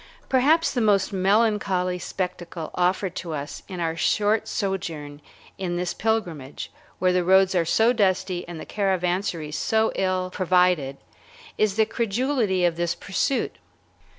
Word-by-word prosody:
Perhaps 300 +6 +3
the 245 - 0
most 200 -3 +2
melancholy 195 -2 +1
spectacle 175 -3 -5
offered 180 +1 0
to 170 -3 -4
us 145 -1 -5
in 185 -3 -7
our 165 -1 -1
short 210 +5 +1
sojourn 160 -7 -3 0.4
in 180 -2 -2
this 180 0 -2
pilgrimage, 175 -11 -2 0.3
where 185 -1 +2
the 180 0 +2
roads 190 +1 +4
are 175 -2 +2
so 225 +8 +3
dusty 190 -4 +1
and 170 -2 -7
the - - -7
caravansaries 180 -5 -1
so 220 0 +2
ill 185 -1 -1
provided, 180 -7 +2 0.6
is 210 -2 +1
the 220 0 +4
credulity 225 -4 0
of 170 -1 +1
this 170 -1 0
pursuit. 200 +7 -1
185 Hz, 140 wpm, -24 LUFS, 175-210 Hz, 0.6 s, roads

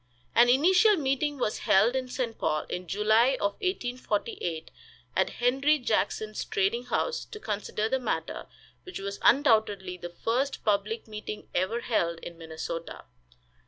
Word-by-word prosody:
An 240 +1 +6
initial 360 - +5
meeting 285 0 0
was 215 -4 -1
held 215 +7 +4
in 260 -1 -1
St. 250 -3 -3
Paul, 155 - 0
in 180 0 -6
July 215 +7 +3
of 200 - +1
1848, 245 - -2 0.4
at - - +2
Henry 270 +5 +2
Jackson's 215 -3 -1
trading 215 +6 0
house, 475 - -1
to 430 - -10
consider 210 - -2
the 265 +3 0
matter, 250 - -3 0.3
which 370 - -8
was 200 0 -5
undoubtedly 215 -9 +3
the 175 0 -7
first 240 +10 -1
public 210 +2 0
meeting 210 0 -7
ever 190 +7 0
held 170 -9 0
in 170 - -8
Minnesota. 165 0 -6
225 Hz, 140 wpm, -28 LUFS, 200-265 Hz, 0.4 s, An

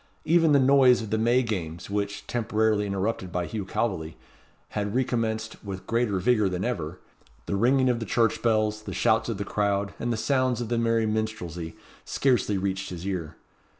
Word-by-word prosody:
Even 165 -1 +4
the 145 - +6
noise 130 -3 +5
of 110 - -7
the 110 - +2
May 120 +3 +3
Games, 85 -8 -4
which, 100 0 -3
temporarily 110 -3 +1
interrupted 100 -1 -2
by 90 0 -1
Hugh 105 -1 -4
Calveley, 90 -7 -2 0.5
had 105 0 -3
recommenced 115 -4 -1
with 95 -2 -6
greater 115 -4 0
vigour 105 +1 +2
than 90 0 -2
ever 85 -8 -3 0.5
the - - -2
ringing 130 +5 +3
of 120 -2 +2
the 115 - -4
church 115 0 +1
bells, 110 -2 +1
the - - -7
shouts 110 +2 +2
of 115 - -2
the 100 - -3
crowd, 100 -1 0
and 120 - -1
the 115 - -1
sounds 130 +2 +1
of 120 -2 -4
the 120 -1 +1
merry 115 -1 +2
minstrelsy, 105 -7 -3 0.3
scarcely 120 -7 +1
reached 95 0 -2
his 90 0 -7
ear. 90 -6 -3
110 Hz, 185 wpm, -26 LUFS, 100-120 Hz, 0.5 s, the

